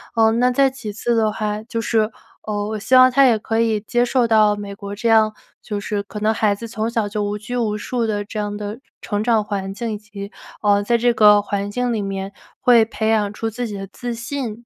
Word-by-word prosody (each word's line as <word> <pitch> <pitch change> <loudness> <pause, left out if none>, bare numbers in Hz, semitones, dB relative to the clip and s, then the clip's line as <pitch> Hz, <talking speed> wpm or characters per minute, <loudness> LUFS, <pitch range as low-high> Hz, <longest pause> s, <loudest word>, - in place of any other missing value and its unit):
呃， 225 -1 +4
那 245 +2 +3
再 270 +2 +3
其 245 -6 -7
次 235 +3 -1
的 220 -1 +2
话， 210 0 -3
就 230 0 -4
是， 220 -2 +1 0.3
呃， 205 -1 -3
我 215 0 -3
希 210 +5 -3
望 255 0 +8
他 275 +2 +4
也 235 -4 +4
可 225 +1 -1
以 225 -2 +2
接 240 +3 +1
受 245 -1 +2
到 215 -2 +4
美 200 -1 -7
国 200 0 -7
这 230 +3 -1
样 220 -1 +4 0.3
就 210 -3 -4
是 205 0 -3
可 210 +1 -8
能 215 +1 +2
孩 215 -2 +2
子 230 +3 -7
从 220 -1 -3
小 225 -3 -1
就 210 0 -2
无 205 0 -2
拘 215 +4 -6
无 220 -3 0
束 235 +2 -2
的 205 -2 -1
这 210 +1 -8
样 205 0 -3
的 210 +2 -6 0.2
成 205 -1 -2
长 225 -2 +2
环 195 -2 -4
境， 225 +2 -4
以 - - -4
及， 205 -1 -9 0.3
呃， 205 -1 +3
在 235 +3 +2
这 240 +1 +3
个 210 -2 +6
环 200 0 -3
境 250 +2 -1
里 220 -3 -1
面 195 0 -4 0.3
会 235 -3 +5
培 220 -1 -2
养 210 -2 +1
出 225 +1 -3
自 245 +3 -4
己 210 - -6
的 195 0 -6
自 245 -1 -5
信， 235 -1 -5
215 Hz, 260 characters per minute, -20 LUFS, 205-235 Hz, 0.3 s, 望